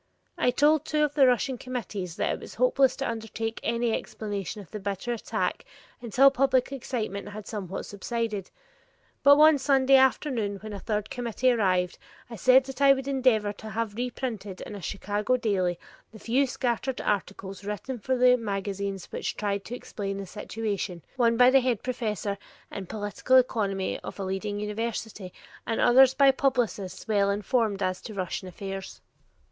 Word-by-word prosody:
I - - +2
told 295 +4 +3
two 305 -1 +1
of 295 -1 0
the 280 -3 +5
Russian 250 0 +1
committees 205 -8 -5
that - - 0
it - - -5
was - - -10
hopeless 275 - +3
to 275 - -3
undertake 225 0 -4
any 235 0 0
explanation 205 -1 -4
of 195 - -12
the 215 - -5
bitter 200 +4 -3
attack 230 - -2 0.4
until 255 +4 +5
public 265 -1 +2
excitement 220 -7 -4
had 205 0 -8
somewhat 195 -3 -5
subsided; 210 -1 -3 0.7
but 285 +1 +7
one 305 -1 +7
Sunday 270 0 +5
afternoon 255 -6 +1
when 215 0 -7
a 200 - -5
third 210 0 -3
committee 245 +1 +1
arrived, 185 -6 +1 0.3
I - - -5
said 255 +5 +5
that 265 0 -8
I 275 -1 +8
would 270 0 -4
endeavor 250 -7 +2
to 215 +1 -10
have 220 0 -2
reprinted 225 -5 -4
in - - -7
a 200 - -7
Chicago 205 +6 -1
daily 185 -7 0 0.3
the 220 - -12
few 255 +6 +1
scattered 250 +1 -2
articles 195 -1 -3
written 210 +5 -5
for 260 +5 -1
the 250 0 +6
magazines 200 -3 -3
which - - -4
tried 200 -1 -1
to 245 - -5
explain 195 -5 -5
the 200 - -5
situation, 200 -3 -4
one 235 -2 +3
by 250 +1 +7
the 270 0 +6
head 245 -4 0
professor 215 -5 -2 0.3
in 190 -2 -6
political 210 +5 0
economy 205 -6 +1
of - - -9
a - - -2
leading 195 +2 -3
university, 210 -2 -4 0.4
and 225 - -1
others 260 +1 +6
by 275 -1 +6
publicists 235 -9 -1
well 200 -2 +2
informed 205 0 0
as 185 0 -1
to 215 - -8
Russian 185 0 -3
affairs. 195 +1 -7
220 Hz, 170 wpm, -27 LUFS, 200-255 Hz, 0.7 s, I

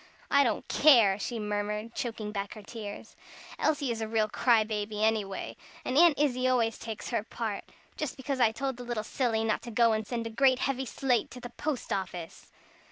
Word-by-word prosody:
"I 280 0 +6
don't 230 -5 -1
care!" 230 -10 +6
she 235 +3 -3
murmured, 210 +1 -3
choking 220 -3 -4
back 200 -1 -4
her 215 - -10
tears. 205 -1 -8 0.4
"Elsie 290 -5 +1
is 225 -1 -3
a 220 - -2
real 220 -1 +1
cry 230 -1 +3
baby, 210 0 -3
anyway. 215 -3 0 0.3
And 255 - -1
Aunt 330 0 +6
Izzie 255 -3 +1
always 235 -3 +1
takes 225 -2 -6
her 230 - +1
part. 220 -1 -4 0.3
Just 300 -4 -3
because 265 0 -3
I 230 -3 +5
told 265 +2 -3
the 250 - -7
little 240 -3 -3
silly 225 -1 0
not 220 -1 0
to - - -8
go 230 0 +4
and 215 -1 -2
send 235 -2 -3
a 230 - -4
great 260 +2 +4
heavy 265 0 -1
slate 250 -1 0
to 250 - -10
the 245 -1 -8
post 250 -3 -3
office!" 180 -4 -5
230 Hz, 200 wpm, -29 LUFS, 215-255 Hz, 0.4 s, I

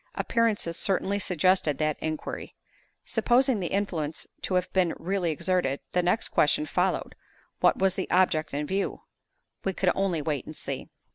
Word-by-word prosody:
Appearances 215 -7 +1
certainly 195 +1 0
suggested 180 -5 +2
that 155 0 0
inquiry. 155 -1 -4 0.5
Supposing 245 +1 +3
the 180 - -2
influence 165 -6 -2 0.2
to 185 - -1
have 180 0 0
been 180 -3 +2
really 180 0 -1
exerted, 165 -3 0
the 180 - +2
next 180 +6 +1
question 150 0 +3
followed, 180 +5 0 0.5
What - - +4
was 190 -1 +2
the 190 - -4
object 160 -4 +2
in 145 +1 -2
view? 195 +5 -2 0.6
We 195 - 0
could 185 -1 +2
only 185 -6 0
wait 150 -4 -2
and 155 - -8
see. - - -5
180 Hz, 155 wpm, -27 LUFS, 155-195 Hz, 0.6 s, What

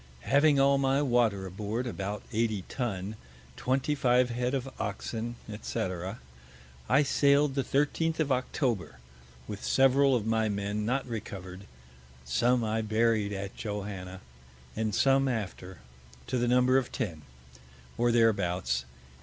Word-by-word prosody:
Having 140 - +4
all 140 0 +4
my 135 +1 +2
Water 120 -7 +2
aboard, 105 +6 -3
about 105 -3 -4
80 110 -3 0
Tun, 105 -4 -4 0.4
25 130 -2 +1
Head 125 +2 -1
of 135 -1 -3
Oxen, 110 +3 -4 0.3
&c., - - -4 1.1
I 140 +5 +5
sail'd 140 0 +3
the 135 -1 0
13th 150 +5 0
of 150 -3 +1
October, 125 - -1 0.5
with 105 -1 -7
several 135 0 +4
of 110 -4 -1
my 110 -1 +1
Men 100 +1 -2
not 135 +3 0
recover'd; 95 -4 -7 0.6
some 120 - +2
I 110 0 0
buried 110 -1 +1
at 100 -1 -5
Johanna, 100 -3 -5 0.5
and 110 -2 -1
some 135 0 +4
after, 95 -6 -4 0.5
to 125 - -1
the 120 - +1
Number 125 +2 +4
of 125 - -6
Ten, 85 -11 -3 0.7
or 120 0 +2
thereabouts. 90 - +1
115 Hz, 130 wpm, -29 LUFS, 100-130 Hz, 1.1 s, I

